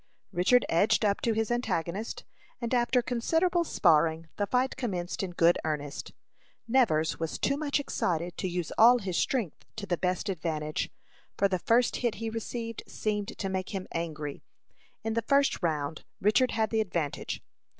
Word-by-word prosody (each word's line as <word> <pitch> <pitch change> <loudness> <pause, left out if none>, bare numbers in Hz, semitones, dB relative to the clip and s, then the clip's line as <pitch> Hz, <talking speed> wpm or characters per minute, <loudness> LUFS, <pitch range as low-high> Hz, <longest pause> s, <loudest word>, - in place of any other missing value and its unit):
Richard 185 +9 +4
edged 200 +6 +3
up 200 -1 +1
to 230 - +1
his 220 +1 0
antagonist, 210 -4 -2 0.4
and 235 0 -3
after 245 0 +3
considerable 330 +9 +1
sparring, 160 - +3
the 205 - 0
fight 255 +3 +1
commenced 190 -9 -3
in 195 - -2
good 175 0 +3
earnest. 150 -2 -3 0.6
Nevers 160 - +2
was 165 -1 -2
too 275 - +1
much 290 -1 0
excited 175 - -1
to 185 - -1
use 175 -2 -3
all 240 +3 +8
his 190 -6 -3
strength 225 - -1
to 215 -2 -5
the 175 -3 -1
best 185 +3 -1
advantage, 155 -4 -2 0.5
for 200 - +4
the 185 -2 -1
first 235 +6 +3
hit 240 -3 0
he 225 0 -4
received 230 0 -4
seemed 210 -1 -3
to 195 - -2
make 190 +1 -3
him 190 -1 -4
angry. 155 -4 -4 0.6
In 225 0 -1
the 230 - +1
first 280 +4 +2
round 155 -3 -1 0.2
Richard 215 +6 +4
had 220 -1 0
the 220 -1 +2
advantage. 170 -8 -3
200 Hz, 165 wpm, -29 LUFS, 170-235 Hz, 0.6 s, all